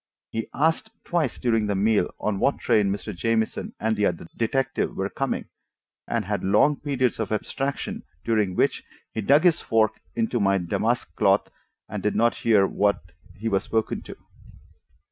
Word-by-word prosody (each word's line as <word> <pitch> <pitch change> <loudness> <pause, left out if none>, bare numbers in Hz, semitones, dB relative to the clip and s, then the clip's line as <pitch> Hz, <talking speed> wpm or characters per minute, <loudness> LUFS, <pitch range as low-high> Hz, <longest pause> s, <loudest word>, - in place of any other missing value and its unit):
He 115 0 -3
asked 160 +2 +1
twice 165 -8 0
during 115 -3 +1
the 100 - 0
meal 105 +2 +2
on 105 -2 -1
what 140 - +2
train 105 -4 +2
Mr. 105 0 -4
Jamieson 110 +4 -1
and 110 +1 +1
the 105 -1 +2
other 85 -2 -3
detective 135 +3 0
were 95 +1 -2
coming, 135 -1 -2 0.6
and - - -1
had - - -2
long 105 +10 +4
periods 130 -5 0
of 110 -2 -2
abstraction 135 +6 -2 0.2
during 105 -5 +1
which - - +1 0.3
he 110 - -2
dug 140 +8 +4
his 175 -3 +4
fork 110 -1 +1
into 225 - 0
my 100 -1 +3
damask 85 -3 -1
cloth - - +2 0.4
and 100 0 -5
did 105 - 0
not 115 +1 +3
hear 105 -4 +4
when 100 +1 +2 0.4
he 110 +2 -4
was 100 -3 +2
spoken 110 -1 -1
to. - - -10
110 Hz, 165 wpm, -25 LUFS, 100-130 Hz, 0.6 s, long